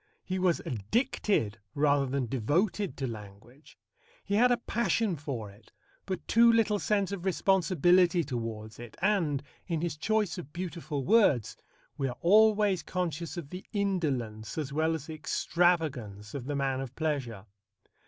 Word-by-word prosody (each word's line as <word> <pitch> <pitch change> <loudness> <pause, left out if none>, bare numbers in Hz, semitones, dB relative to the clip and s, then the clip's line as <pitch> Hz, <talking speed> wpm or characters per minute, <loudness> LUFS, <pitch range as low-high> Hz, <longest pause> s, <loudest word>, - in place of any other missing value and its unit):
He 185 0 -3
was 180 -2 +2
addicted 115 - -1 0.2
rather 145 -1 +3
than 135 0 -1
devoted 170 - 0
to 135 - -2
language. 110 +5 -11 0.5
He 200 - -3
had 245 +4 +5
a 245 - +3
passion 225 -4 0
for 130 -8 -5
it, 105 +2 -20 0.4
but 185 -2 -4
too 235 +1 +6
little 220 -2 +2
sense 200 -2 0
of 195 -3 -5
responsibility 180 -2 +3
towards 115 -5 -5
it, 120 -2 -10
and, 175 -8 +1 0.2
in 165 -4 -1
his 170 -2 -2
choice 205 0 0
of 150 -4 -9
beautiful 170 -6 -4
words, 145 - +3 0.4
we 135 - +1
are 125 - -5
always 210 -1 +4
conscious 170 0 -3
of 150 -5 -7
the 180 +1 -7
indolence 145 - -2
as 145 -3 -3
well 160 +2 +1
as 155 -3 -6
the 160 - -7
extravagance 150 - 0
of 135 -4 -5
the 145 +1 -3
man 135 -1 0
of 135 -1 -7
pleasure. 130 -11 -2
160 Hz, 155 wpm, -29 LUFS, 130-190 Hz, 0.5 s, too